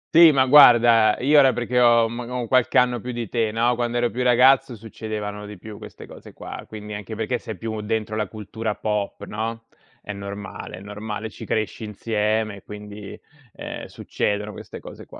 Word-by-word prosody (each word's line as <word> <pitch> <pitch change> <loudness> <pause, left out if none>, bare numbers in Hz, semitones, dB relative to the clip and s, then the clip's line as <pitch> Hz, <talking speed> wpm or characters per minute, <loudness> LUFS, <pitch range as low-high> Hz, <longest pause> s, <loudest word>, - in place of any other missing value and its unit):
Sì, 165 -1 +9
ma 130 -2 +3
guarda, 120 -5 +7
io 145 +4 +5
ora 135 -2 +5
perché 120 +1 -1
ho, 120 -1 +5
uhm, 115 +2 -5
un 120 -1 -6
ho 125 -1 -3
qualche 130 0 +2
anno 125 -1 +3
più 125 +3 -6
di 120 -1 -4
te, 115 -3 0
no, 115 +2 +1
quando 120 0 -2
ero 120 0 +1
più 125 +5 -4
ragazzo 125 +1 +4
succedevano 105 -1 -6
di 105 0 -10
più 105 +3 -11
queste - - -11
cose - - -13
qua, - - -9
quindi 105 -1 -8
anche 105 +2 -7
perché 115 +3 -2
sei 110 - -8
più 110 +2 -5
dentro 110 0 -3
la 105 -1 -1
cultura 110 +1 -5
pop, 105 -2 -3
no, 115 +2 -5 0.4
è 105 - -6
normale, 100 -2 -8
è 95 - -11
normale, 105 +1 -6
ci - - -10
cresci 110 0 -2
insieme 105 0 -1
e 100 - -15
quindi, 105 -1 -10 0.3
ehm, - - -7
succedono 105 +1 -3
queste - - -10
cose - - -12
qua. - - -13
110 Hz, 195 wpm, -23 LUFS, 105-120 Hz, 0.4 s, Sì